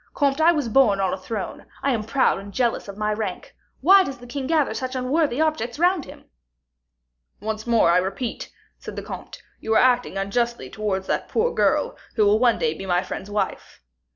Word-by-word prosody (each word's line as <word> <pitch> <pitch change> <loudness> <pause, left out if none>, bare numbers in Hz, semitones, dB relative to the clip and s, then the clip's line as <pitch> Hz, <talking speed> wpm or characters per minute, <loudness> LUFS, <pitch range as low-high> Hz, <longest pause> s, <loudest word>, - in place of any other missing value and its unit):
Comte, 280 0 +1
I 330 +2 +6
was 295 -7 -1
born 220 -4 +4
on 190 -2 +1
a - - 0
throne, 195 +1 -6 0.2
I 275 - +2
am 225 -4 -1
proud 260 -1 +2
and 200 +1 -10
jealous 240 -1 0
of 200 0 -8
my 210 0 0
rank. 225 - -5 0.3
Why 385 +6 +7
does 275 -5 -6
the 245 - -13
king 265 +2 -5
gather 310 -3 +2
such 255 0 -4
unworthy 260 +1 0
objects 310 -7 0
round 355 -1 +2
him?" - - -13 1.1
"Once 220 +1 -4
more, 230 -7 +4
I - - +4
repeat," 195 +6 -3 0.3
said - - -8
the - - -5
comte, - - -9 0.2
"you 220 0 -1
are - - +6
acting 245 -5 +2
unjustly 235 +5 -1
towards 200 -3 -2
that - - -2
poor 470 +2 +1
girl, - - +1 0.2
who 215 - +3
will 210 +2 +4
one 240 -1 +4
day 155 - 0
be 195 +4 -8
my 180 0 +2
friend's 190 +2 -6
wife." 205 0 -3
235 Hz, 205 wpm, -23 LUFS, 205-275 Hz, 1.1 s, Why